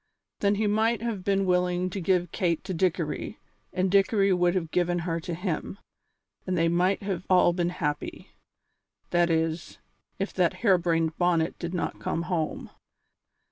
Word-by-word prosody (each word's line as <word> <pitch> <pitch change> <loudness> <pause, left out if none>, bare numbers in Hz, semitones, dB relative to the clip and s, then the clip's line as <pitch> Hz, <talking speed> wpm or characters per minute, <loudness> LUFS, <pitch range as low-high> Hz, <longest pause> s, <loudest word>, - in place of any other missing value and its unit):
Then 200 0 +2
he 215 +2 0
might 220 +2 +1
have 220 -6 -3
been 195 0 +1
willing 180 0 +1
to 195 - -4
give 180 -1 +1
Kate 170 -5 0
to 190 - -4
Dickory, 170 -3 -1 0.3
and 185 0 0
Dickory 195 0 +3
would 175 0 +2
have 165 -4 -2
given 175 0 +1
her 165 -1 -1
to 170 +1 -5
him, 180 +1 -3 0.7
and 185 -1 0
they 165 0 +3
might 180 +4 +1
have 190 -3 -3
all 180 -2 +5
been 175 -1 0
happy. 150 -5 -4 0.8
That 175 0 +3
is, 160 +1 -1 0.4
if 195 - -3
that 180 -1 +2
hare 190 -4 +5
brained 165 -2 0
Bonnet 175 -2 +1
did 175 +1 -4
not 175 - -3
come 165 - -2
home. 170 -3 -3
180 Hz, 165 wpm, -27 LUFS, 170-190 Hz, 0.8 s, all